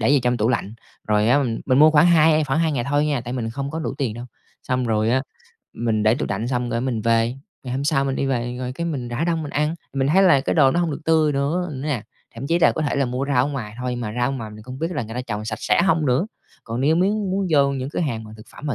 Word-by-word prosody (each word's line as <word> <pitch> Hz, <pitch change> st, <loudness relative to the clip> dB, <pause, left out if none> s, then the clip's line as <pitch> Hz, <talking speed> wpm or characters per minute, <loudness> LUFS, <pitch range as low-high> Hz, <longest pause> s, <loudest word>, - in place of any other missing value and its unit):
để 110 Hz, +5 st, +2 dB
vào 145 Hz, -, +5 dB
trong 125 Hz, 0 st, +1 dB
tủ 110 Hz, +1 st, +1 dB
lạnh, 115 Hz, -3 st, -1 dB, 0.3 s
rồi 105 Hz, +1 st, +3 dB
á 140 Hz, -, +5 dB
mình 115 Hz, -3 st, -2 dB
mình 130 Hz, 0 st, +3 dB
mua 155 Hz, +1 st, +7 dB
khoảng 155 Hz, +2 st, +5 dB
hai 155 Hz, -2 st, +4 dB
khoảng 145 Hz, +1 st, 0 dB
2 160 Hz, -2 st, +1 dB
ngày 120 Hz, -4 st, -1 dB
thôi 145 Hz, +1 st, +2 dB
nha, 145 Hz, -4 st, 0 dB
tại 120 Hz, +1 st, -6 dB
mình 115 Hz, -3 st, -3 dB
không 140 Hz, +4 st, -4 dB
có 160 Hz, -, -4 dB
đủ 160 Hz, -, -3 dB
tiền 120 Hz, -6 st, -1 dB
đâu. 120 Hz, +1 st, -7 dB, 0.4 s
Xong 130 Hz, 0 st, -1 dB
rồi 110 Hz, 0 st, +1 dB
á, 130 Hz, +2 st, +2 dB, 0.5 s
mình 110 Hz, -2 st, -1 dB
để 110 Hz, +2 st, +4 dB
tủ 145 Hz, -, -3 dB
lạnh 110 Hz, +5 st, -2 dB
xong, 125 Hz, -2 st, -1 dB
cái, 115 Hz, -, -1 dB
mình 125 Hz, -3 st, -2 dB
về, 115 Hz, +1 st, +2 dB, 0.3 s
ngày 125 Hz, -2 st, -6 dB
hôm 140 Hz, +2 st, -2 dB
sau 140 Hz, -2 st, +2 dB
mình 135 Hz, -1 st, -1 dB
đi 135 Hz, -, -1 dB
về 120 Hz, -2 st, -2 dB
rồi, 125 Hz, 0 st, -4 dB
cái, 170 Hz, +5 st, -4 dB
mình 130 Hz, -7 st, -3 dB
rã 120 Hz, +7 st, -2 dB
đông 165 Hz, -2 st, 0 dB
mình 145 Hz, -, -6 dB
ăn, 150 Hz, +3 st, 0 dB, 0.2 s
mình 135 Hz, -1 st, 0 dB
thấy 190 Hz, +5 st, +4 dB
là 170 Hz, -8 st, +5 dB
cái -, -, -1 dB
đồ 140 Hz, -5 st, +5 dB
nó 175 Hz, -, +1 dB
hông 170 Hz, -2 st, 0 dB
được 145 Hz, -, -5 dB
tươi 160 Hz, -2 st, +3 dB
nữa 155 Hz, +6 st, -1 dB
nè. 135 Hz, -4 st, -3 dB, 0.3 s
Thậm 125 Hz, +4 st, -6 dB
chí 170 Hz, +2 st, +2 dB
là 170 Hz, -, +4 dB
có 155 Hz, -, -2 dB
thể 145 Hz, -, -1 dB
là 140 Hz, -, +2 dB
mua 125 Hz, +2 st, -2 dB
rau 130 Hz, -3 st, +2 dB
ở -, -, -1 dB
ngoài 115 Hz, -7 st, -5 dB
thôi, 125 Hz, -1 st, -3 dB
mà 110 Hz, -3 st, -4 dB
rau 120 Hz, +1 st, +2 dB
ở -, -, -3 dB
ngoài 115 Hz, -5 st, -5 dB
mình 105 Hz, 0 st, -11 dB
không 130 Hz, +3 st, -9 dB
biết 165 Hz, +3 st, -2 dB
là 130 Hz, -, -2 dB
người 115 Hz, +1 st, -8 dB
ta 125 Hz, -, -2 dB
trồng 105 Hz, -3 st, -5 dB
sạch 110 Hz, -1 st, -4 dB
sẽ 105 Hz, +9 st, +2 dB
hông 165 Hz, -5 st, +2 dB
nữa. 130 Hz, +10 st, +2 dB, 0.4 s
Còn 115 Hz, +2 st, -4 dB
nếu 155 Hz, +4 st, +3 dB
mếu 185 Hz, +3 st, +3 dB
muốn 195 Hz, -2 st, -1 dB
vô 140 Hz, -3 st, +4 dB
những 135 Hz, -1 st, -3 dB
cửa -, -, -3 dB
hàng 115 Hz, -9 st, -2 dB
mà 110 Hz, -, -11 dB
thực 110 Hz, -, -14 dB
phẩm 150 Hz, -, -9 dB
mà 140 Hz, -, -1 dB
135 Hz, 310 wpm, -22 LUFS, 120-150 Hz, 0.5 s, mua